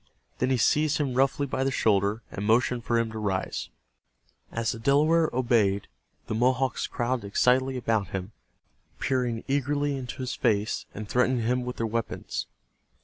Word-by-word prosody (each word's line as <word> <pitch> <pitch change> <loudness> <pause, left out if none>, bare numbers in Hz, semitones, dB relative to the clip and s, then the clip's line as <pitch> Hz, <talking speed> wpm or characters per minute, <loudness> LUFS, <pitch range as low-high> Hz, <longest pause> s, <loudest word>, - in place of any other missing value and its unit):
Then 130 - +1
he 130 - +2
seized 150 +5 +3
him 140 -4 -1
roughly 135 +2 +2
by 130 -1 -1
the 135 - +1
shoulder, 105 -3 +1
and 100 - -5
motioned 120 +2 +2
for 120 - +1
him 115 -1 0
to 110 - -5
rise. 95 -3 -2 0.8
As 115 -1 -1
the 115 - -6
Delaware 155 +6 +3
obeyed 115 -6 +2 0.4
the - - -4
Mohawks 125 +3 +1
crowded 120 -3 -2
excitedly 130 +5 +2
about 115 -5 0
him, 95 +3 -5 0.7
peering 125 -3 -1
eagerly 145 +1 0
into 130 -2 -6
his 130 - -3
face, 105 -3 0
and 105 0 -6
threatening 125 +1 +2
him 125 +1 0
with 125 - -4
their 115 - -2
weapons. 110 - -3
120 Hz, 160 wpm, -27 LUFS, 110-130 Hz, 0.8 s, seized